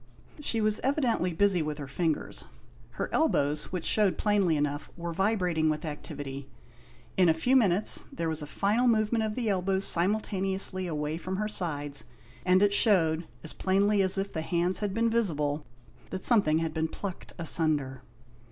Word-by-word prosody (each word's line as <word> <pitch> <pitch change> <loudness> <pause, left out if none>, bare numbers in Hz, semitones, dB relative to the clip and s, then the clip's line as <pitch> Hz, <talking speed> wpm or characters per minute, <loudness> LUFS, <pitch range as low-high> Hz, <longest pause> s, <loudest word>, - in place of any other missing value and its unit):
She 230 -6 -1
was 215 0 +2
evidently 255 - 0
busy 190 +1 +3
with 150 -1 -3
her 145 -2 -6
fingers; 160 +3 -2 0.5
her - - -3
elbows, 150 - +1
which 180 -3 -5
shewed 210 -3 +2
plainly 200 -6 +2
enough, 145 0 -2
were 170 0 -4
vibrating 180 -4 +1
with 155 +1 -2
activity. 145 -3 -7 0.7
In 180 -2 +5
a 160 - +4
few 250 +11 +1
minutes 210 -5 +3
there 165 -1 -3
was 160 -1 -2
a 150 - -6
final 210 - +1
movement 220 0 +2
of 215 -1 -2
the 245 -3 -2
elbows 190 -1 0
simultaneously 190 0 0
away 150 -1 -3
from 185 +2 -4
her 210 +2 -1
sides, 145 -8 -3 0.4
and 185 +2 +4
it 205 0 +3
shewed, 170 -7 +3 0.2
as 160 - -5
plainly 200 +2 +2
as 190 0 0
if 195 +1 -3
the 160 - -2
hands 175 +3 0
had 205 -2 -2
been 230 +3 +1
visible, 150 - 0 0.4
that 185 - -5
something 200 -10 +4
had 165 -1 -2
been 160 0 0
plucked 190 +3 -7
asunder. 150 -5 0
180 Hz, 170 wpm, -28 LUFS, 155-205 Hz, 0.7 s, In